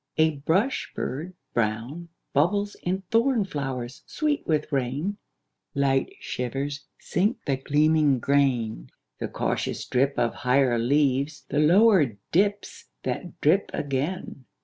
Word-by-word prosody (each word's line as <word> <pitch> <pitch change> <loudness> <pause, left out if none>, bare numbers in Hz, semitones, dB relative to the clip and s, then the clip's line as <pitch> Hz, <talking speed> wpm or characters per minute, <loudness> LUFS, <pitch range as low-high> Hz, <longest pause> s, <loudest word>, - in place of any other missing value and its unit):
A 160 -1 +3
brush 190 - 0
bird 160 +8 -4 0.2
brown 120 +9 -2 0.2
Bubbles 200 +8 +2
in 190 +2 -2
thorn 230 -1 +3
flowers 135 -7 -4
sweet 300 -2 -1
with 155 -1 0
rain; 140 +9 -1 0.6
Light 135 -1 +1
shivers 135 +3 -4
sink 205 +7 0
the 135 -2 +1
gleaming 150 0 +3
grain; 120 - +1 0.3
The - - -2
cautious - - -2
drip 135 +2 +1
of 115 - +1
higher 125 -1 +2
leaves 140 +3 +1
The 145 - 0
lower 165 - +5
dips 200 +3 0 0.2
that 180 - -4
drip 180 +7 +3
again. 145 +1 -3
145 Hz, 120 wpm, -26 LUFS, 130-180 Hz, 0.6 s, lower